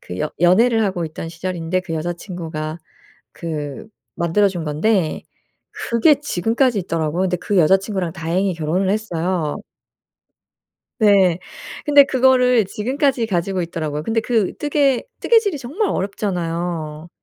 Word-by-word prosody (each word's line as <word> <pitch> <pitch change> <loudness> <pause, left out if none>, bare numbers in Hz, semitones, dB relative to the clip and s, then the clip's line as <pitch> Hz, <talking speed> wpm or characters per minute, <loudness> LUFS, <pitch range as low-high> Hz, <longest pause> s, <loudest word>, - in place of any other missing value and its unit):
그 90 +1 -8
연 - - -2
연애를 225 +6 +4
하고 180 -4 -1
있던 160 +1 -6
시절인데 175 +1 -3
그 180 -3 -5
여자친구가 165 -1 -5 0.5
그 150 0 -6 0.3
만들어준 175 +1 +1
건데 160 +3 0 0.5
그게 235 +6 +3
지금까지 235 -2 +1
있더라고요. 165 -1 -2
근데 180 -1 0
그 200 +2 -1
여자친구랑 190 +1 +2
다행히 180 +4 -1
결혼을 165 +4 -1
했어요. 180 -6 -1 1.4
네. 195 -5 +4 0.5
근데 290 -1 +8
그거를 250 -3 +4
지금까지 255 - 0
가지고 185 -1 -1
있더라고요. 155 -3 -4
근데 225 +7 0
그 220 -4 0
뜨개 285 -3 +1 0.2
뜨개질이 445 -8 +3
정말 310 - -2
어렵잖아요. 170 -5 -3
185 Hz, 305 characters per minute, -20 LUFS, 165-225 Hz, 1.4 s, 근데